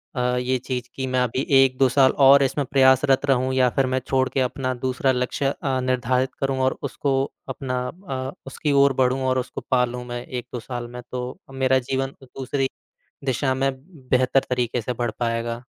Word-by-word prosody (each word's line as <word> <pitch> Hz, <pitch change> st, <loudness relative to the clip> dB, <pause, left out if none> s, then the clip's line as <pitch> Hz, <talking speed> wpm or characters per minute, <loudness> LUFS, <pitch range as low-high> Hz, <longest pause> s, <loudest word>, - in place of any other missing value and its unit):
अ, -, -, -2 dB, 0.2 s
ये 125 Hz, +1 st, 0 dB
चीज़ 125 Hz, -1 st, -5 dB
कि 130 Hz, -1 st, -3 dB
मैं 130 Hz, 0 st, 0 dB
अभी 125 Hz, +2 st, -1 dB, 0.2 s
1-2 130 Hz, 0 st, +2 dB
साल 130 Hz, +1 st, +5 dB, 0.2 s
और 140 Hz, +1 st, +8 dB
इसमें 140 Hz, +1 st, 0 dB
प्रयासरत 130 Hz, 0 st, +4 dB
रहूँ 130 Hz, -1 st, +1 dB
या 130 Hz, -1 st, +4 dB
फिर 135 Hz, -, +3 dB
मैं 130 Hz, 0 st, 0 dB
छोड़के 130 Hz, 0 st, +1 dB
अपना 130 Hz, 0 st, -1 dB
दूसरा 130 Hz, +1 st, +1 dB
लक्ष्य 125 Hz, +2 st, -1 dB, 0.2 s
अ, 135 Hz, -2 st, 0 dB
निर्धारित 130 Hz, 0 st, 0 dB
करूँ 135 Hz, -1 st, -1 dB
और 130 Hz, 0 st, +1 dB
उसको 135 Hz, -2 st, -1 dB, 0.3 s
अपना 130 Hz, -2 st, -3 dB, 0.2 s
अ, 130 Hz, 0 st, -3 dB, 0.2 s
उसकी 145 Hz, +2 st, -2 dB
ओर 140 Hz, -1 st, +4 dB
बढ़ूँ 130 Hz, +1 st, +1 dB
और 130 Hz, 0 st, +2 dB
उसको 125 Hz, -, -5 dB
पा 125 Hz, -1 st, +4 dB
लूँ 125 Hz, 0 st, -6 dB
मैं, 120 Hz, 0 st, -6 dB
1-2 125 Hz, -1 st, -5 dB
साल 120 Hz, 0 st, -6 dB
में? 125 Hz, +1 st, -8 dB
तो 125 Hz, 0 st, -3 dB, 0.2 s
अ, -, -, -13 dB
मेरा 130 Hz, 0 st, +2 dB
जीवन 135 Hz, +1 st, -2 dB
तो 135 Hz, -, -15 dB
दूसरी 135 Hz, +1 st, -2 dB, 0.6 s
दिशा 130 Hz, 0 st, 0 dB
में 135 Hz, +1 st, +1 dB, 0.4 s
बेहतर 130 Hz, +1 st, +3 dB
तरीके 125 Hz, -1 st, 0 dB
से 125 Hz, -, -2 dB
बढ़ 120 Hz, -1 st, 0 dB
पाएगा। 115 Hz, 0 st, -2 dB
130 Hz, 190 wpm, -23 LUFS, 125-135 Hz, 0.6 s, और